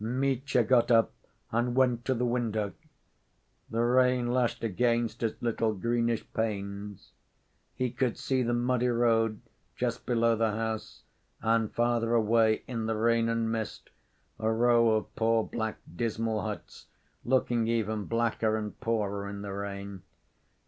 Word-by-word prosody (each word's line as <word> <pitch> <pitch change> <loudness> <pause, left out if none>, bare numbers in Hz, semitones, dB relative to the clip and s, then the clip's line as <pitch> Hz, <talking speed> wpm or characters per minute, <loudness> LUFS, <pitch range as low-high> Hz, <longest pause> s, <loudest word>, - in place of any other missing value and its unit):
Mitya 130 +1 +1
got 120 +1 +3
up 115 -2 +4 0.4
and 120 +2 0
went 125 -2 +2
to 130 - +1
the 125 +1 0
window.... 110 -4 -1 1.0
The 115 +1 0
rain 125 0 +3
lashed 120 -2 0
against 115 +2 0
its 115 -2 -2
little 115 -2 0
greenish 115 +2 0
panes. 100 -2 -4 0.6
He 125 -2 -1
could 125 -1 -1
see 130 -1 0
the 120 -1 +1
muddy 125 +1 +1
road 115 -2 +2 0.3
just - - -3
below 115 -1 +3
the 110 -1 +1
house, 110 0 -4 0.4
and 115 -1 +1
farther 120 -1 +1
away, 110 0 +3
in 115 -3 -3
the 110 - 0
rain 115 +1 +2
and 115 -1 0
mist, 110 -2 -4 0.5
a 110 0 0
row 115 0 +4
of 110 - -3
poor, 115 0 +2
black, 110 -1 -3 0.2
dismal 110 0 -1
huts, 105 -1 -7 0.4
looking 120 -2 +1
even 110 -2 -1
blacker 115 -1 0
and 105 -1 -5
poorer 100 -3 -1
in 100 0 -6
the 100 -1 -5
rain. 100 -1 -6
115 Hz, 140 wpm, -29 LUFS, 110-120 Hz, 1.0 s, up